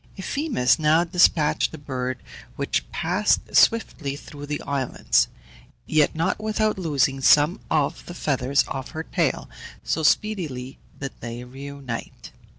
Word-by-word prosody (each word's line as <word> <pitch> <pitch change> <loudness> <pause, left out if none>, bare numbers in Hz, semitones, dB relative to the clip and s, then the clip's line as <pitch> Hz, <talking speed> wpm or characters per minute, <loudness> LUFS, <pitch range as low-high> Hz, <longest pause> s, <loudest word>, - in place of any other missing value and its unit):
Euphemus 190 - +1
now 155 +2 +4
despatched 170 -3 +3
the 160 - -8
bird, 130 -3 -3 0.4
which - - -2
passed 185 +6 0
swiftly 160 -11 +3
through 145 0 -10
the 150 0 -2
islands, 130 - +1 0.6
yet 155 -1 +2
not 175 +6 -1
without 215 -1 0
losing 140 -5 +1
some 150 +5 +5
of 150 -3 0
the 175 - -7
feathers 140 -3 +1
of 135 -1 -5
her 160 - -2
tail, - - -1 0.4
so 160 - -1
speedily 150 -8 0 0.2
did 135 -1 -4
they 120 +1 -6
reunite. 135 -1 -8
145 Hz, 130 wpm, -24 LUFS, 130-170 Hz, 0.6 s, some